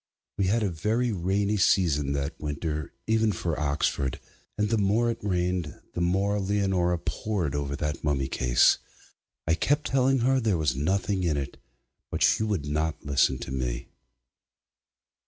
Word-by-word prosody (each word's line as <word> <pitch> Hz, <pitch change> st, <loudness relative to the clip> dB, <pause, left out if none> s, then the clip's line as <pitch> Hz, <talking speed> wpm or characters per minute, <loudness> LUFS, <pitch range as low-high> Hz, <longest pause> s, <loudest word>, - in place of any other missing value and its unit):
We 100 Hz, -, +3 dB
had 110 Hz, +3 st, +2 dB
a 100 Hz, -, 0 dB
very 110 Hz, +9 st, 0 dB
rainy 100 Hz, +2 st, 0 dB
season 75 Hz, -8 st, +2 dB
that 70 Hz, 0 st, -2 dB
winter 75 Hz, 0 st, -3 dB
even 110 Hz, -1 st, +2 dB
for 85 Hz, -4 st, -2 dB
Oxford, 70 Hz, -2 st, 0 dB, 0.4 s
and 105 Hz, -, +1 dB
the 115 Hz, -1 st, +1 dB
more 110 Hz, +4 st, +2 dB
it 115 Hz, -, -6 dB
rained 90 Hz, -4 st, -1 dB
the 85 Hz, -, -3 dB
more 100 Hz, +4 st, +1 dB
Leonora 95 Hz, -3 st, +1 dB
pored 85 Hz, -3 st, -2 dB
over 70 Hz, -1 st, -2 dB
that 75 Hz, 0 st, -3 dB
mummy 70 Hz, -3 st, 0 dB
case. 60 Hz, -2 st, +3 dB, 0.7 s
I 80 Hz, -, +4 dB
kept 145 Hz, -, +1 dB
telling 135 Hz, -1 st, +3 dB
her 130 Hz, +2 st, +3 dB
there 110 Hz, -7 st, +1 dB
was 75 Hz, -5 st, 0 dB
nothing 95 Hz, +6 st, 0 dB
in 80 Hz, -4 st, +1 dB
it, 70 Hz, -1 st, -4 dB, 0.5 s
but -, -, -1 dB
she -, -, +4 dB
would 105 Hz, -9 st, -1 dB
not 75 Hz, +2 st, -2 dB
listen 70 Hz, -2 st, +2 dB
to -, -, -8 dB
me. 60 Hz, -2 st, -3 dB
90 Hz, 155 wpm, -27 LUFS, 75-105 Hz, 0.7 s, I